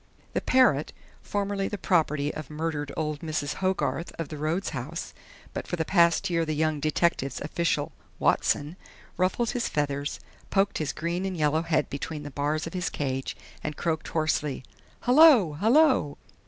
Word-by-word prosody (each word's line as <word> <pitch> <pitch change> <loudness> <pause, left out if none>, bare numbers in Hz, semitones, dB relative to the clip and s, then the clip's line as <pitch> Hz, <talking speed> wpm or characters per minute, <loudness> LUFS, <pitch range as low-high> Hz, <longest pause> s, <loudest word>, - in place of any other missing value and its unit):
The - - 0
parrot, 250 - +3 0.3
formerly 200 -1 -2
the 205 - -4
property 150 -6 +1
of 155 -4 -7
murdered 150 -2 -3
old 150 -2 -2
Mrs. 155 -2 -2
Hogarth 185 -2 0
of 165 -3 -4
the 155 - -6
Rhodes 160 +6 -1
House, 145 +7 -5 0.4
but - - -5
for - - -2
the 160 -2 -1
past 170 +1 +4
year 170 -3 +1
the 155 -1 -2
young 155 0 +1
detective's 155 -2 0
official 150 -1 -1 0.3
"Watson," 150 +5 +1 0.4
ruffled 190 +6 +1
his 245 -1 -1
feathers, 145 -1 -2 0.3
poked 195 0 +1
his 155 -2 -1
green 170 +3 -2
and 190 -2 -3
yellow 155 +1 +2
head 165 -1 +1
between 150 +2 -4
the 145 - -7
bars 150 +3 -1
of 165 - -7
his 180 -1 -1
cage 135 -2 -3 0.3
and 150 -1 -4
croaked 160 -2 -1
hoarsely: 150 -4 -1 0.4
"Hullo! 250 - +7
Hullo!" 235 - +4
160 Hz, 160 wpm, -27 LUFS, 150-185 Hz, 0.4 s, Hullo